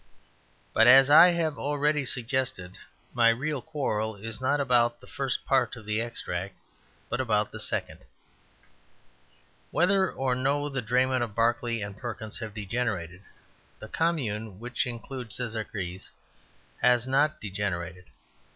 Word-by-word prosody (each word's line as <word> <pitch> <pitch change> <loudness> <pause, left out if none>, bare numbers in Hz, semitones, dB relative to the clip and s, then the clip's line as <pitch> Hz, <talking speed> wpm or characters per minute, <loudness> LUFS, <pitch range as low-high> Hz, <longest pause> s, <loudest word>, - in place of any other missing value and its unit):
But, 115 - +5
as 135 +3 +8
I 165 +4 +10
have 165 -4 0
already 145 0 +1
suggested, 120 -8 -2 0.4
my 115 -1 +5
real 135 +4 -1
quarrel 110 -9 -2
is 110 +3 -7
not 145 +3 +1
about 120 -3 +2
the - - -15
first 135 -2 -3
part 130 -4 +2
of 115 -3 -12
the 105 +1 -1
extract, 100 -5 -5 0.5
but 120 - -2
about 105 -4 0
the - - -8
second. - - -3 1.7
Whether 190 +3 +3
or 130 -1 -1
no 140 +3 0
the 135 -2 -3
draymen 125 +2 +1
of 115 -4 -3
Barclay 115 0 +1
and 100 0 -5
Perkins 110 -1 -6
have 110 -3 -7
degenerated, 100 -5 -3 0.6
the 110 - -10
Commune 110 - -1
which 125 +2 -2
includes 120 -1 -5
Szekeres 105 -6 -5 0.7
has 125 -1 +4
not 140 +4 +2
degenerated. 95 -3 -4
120 Hz, 135 wpm, -27 LUFS, 110-135 Hz, 1.7 s, I